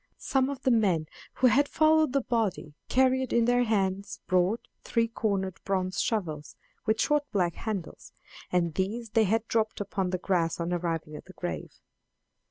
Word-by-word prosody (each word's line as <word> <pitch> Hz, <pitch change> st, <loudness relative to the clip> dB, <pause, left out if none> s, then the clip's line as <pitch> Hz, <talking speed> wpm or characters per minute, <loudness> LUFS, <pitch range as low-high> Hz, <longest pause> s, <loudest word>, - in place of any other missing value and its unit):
Some 265 Hz, 0 st, +1 dB
of 275 Hz, -2 st, -6 dB
the 260 Hz, -, +3 dB
men 190 Hz, -9 st, +2 dB, 0.3 s
who -, -, +1 dB
had 280 Hz, +3 st, +5 dB
followed 310 Hz, -2 st, +4 dB
the 275 Hz, +1 st, +2 dB
body 215 Hz, -10 st, -1 dB, 0.2 s
carried 260 Hz, 0 st, +2 dB
in 235 Hz, -1 st, +3 dB
their 245 Hz, +1 st, +3 dB
hands 200 Hz, -2 st, -1 dB
broad, 185 Hz, +5 st, +1 dB, 0.2 s
three 230 Hz, 0 st, +1 dB
cornered 200 Hz, -5 st, -2 dB
bronze 185 Hz, -1 st, -1 dB
shovels, 160 Hz, -9 st, -2 dB, 0.3 s
with 220 Hz, 0 st, +2 dB
short 295 Hz, -1 st, +1 dB
black 175 Hz, -4 st, +1 dB
handles, 200 Hz, -5 st, -5 dB, 0.4 s
and 170 Hz, -2 st, +1 dB
these 210 Hz, +6 st, -2 dB
they 225 Hz, -1 st, +4 dB
had 225 Hz, +3 st, 0 dB
dropped 220 Hz, -1 st, 0 dB
upon 195 Hz, -2 st, -2 dB
the 185 Hz, -, -1 dB
grass 175 Hz, -3 st, 0 dB
on 170 Hz, +1 st, -1 dB
arriving 165 Hz, -3 st, -2 dB
at -, -, -9 dB
the -, -, -13 dB
grave. -, -, -5 dB
210 Hz, 170 wpm, -28 LUFS, 180-240 Hz, 0.4 s, had